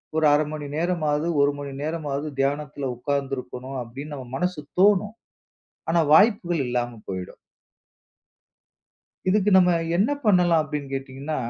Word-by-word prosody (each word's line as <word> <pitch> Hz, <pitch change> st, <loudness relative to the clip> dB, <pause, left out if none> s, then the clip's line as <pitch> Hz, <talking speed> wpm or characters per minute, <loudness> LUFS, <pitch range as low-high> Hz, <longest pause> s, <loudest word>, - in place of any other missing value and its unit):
ஒரு 160 Hz, -1 st, +2 dB
0.5 150 Hz, +1 st, +3 dB
மணி 150 Hz, -1 st, -5 dB
நேரமாவது, 160 Hz, -2 st, 0 dB
1 145 Hz, 0 st, +4 dB
மணி 140 Hz, -1 st, -6 dB
நேரமாவது 155 Hz, -2 st, -3 dB
தியானத்துல 140 Hz, 0 st, -1 dB
உக்கார்ந்து 140 Hz, +1 st, -2 dB
இருக்கணும், 130 Hz, +1 st, -7 dB
அப்டின்னு 140 Hz, +6 st, -8 dB
நம்ம 130 Hz, -3 st, -8 dB
மனசுக்கு 175 Hz, -4 st, -3 dB
தோணும். 205 Hz, +2 st, +4 dB, 0.7 s
ஆனா 170 Hz, +1 st, +3 dB
வாய்ப்புகள் 175 Hz, -, +4 dB
இல்லாம 120 Hz, -2 st, -2 dB
போயிடும். 95 Hz, -1 st, -6 dB, 1.9 s
இதுக்கு 205 Hz, +1 st, +3 dB
நம்ம 180 Hz, -1 st, +5 dB, 0.2 s
என்ன 205 Hz, +9 st, +2 dB
பண்ணலாம் 175 Hz, -5 st, +4 dB
அப்டின்னு 145 Hz, -2 st, -5 dB
கேட்டீங்கன்னா 135 Hz, +3 st, -4 dB
150 Hz, 125 wpm, -24 LUFS, 135-175 Hz, 1.9 s, நம்ம